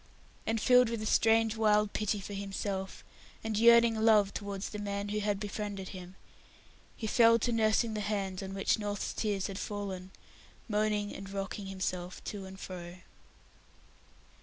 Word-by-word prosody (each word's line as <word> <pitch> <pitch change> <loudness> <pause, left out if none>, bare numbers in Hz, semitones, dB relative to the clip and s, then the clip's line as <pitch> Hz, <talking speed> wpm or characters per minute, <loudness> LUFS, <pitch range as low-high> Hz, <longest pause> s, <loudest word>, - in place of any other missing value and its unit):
And 225 0 +1
filled 250 +1 +5
with 230 -1 -2
a - - -3
strange 225 0 +3
wild 210 -1 +3
pity 210 -1 0
for 200 +1 -7
himself, 195 -1 -4 0.4
and 220 -1 -2
yearning 235 +1 +6
love 220 -3 +4
towards 200 -1 -4
the 210 - -5
man 200 0 -3
who 210 0 0
befriended 205 -1 -5
him, 185 -1 -9 0.8
he 225 - -5
fell 230 +1 +5
to 240 +2 -1
nursing 220 0 +2
the 210 - -2
hand 200 -2 -2
on 195 0 -6
which 195 +2 +1
North's 205 -1 -3
tears 205 -3 -1
had 195 0 -4
fallen, 195 -3 -5 0.6
moaning 210 -1 0
and 195 0 -8
rocking 195 0 -4
himself 185 -1 -4
to 200 -2 -6
and 190 0 -10
fro. 175 -2 -7
205 Hz, 155 wpm, -31 LUFS, 195-220 Hz, 0.8 s, yearning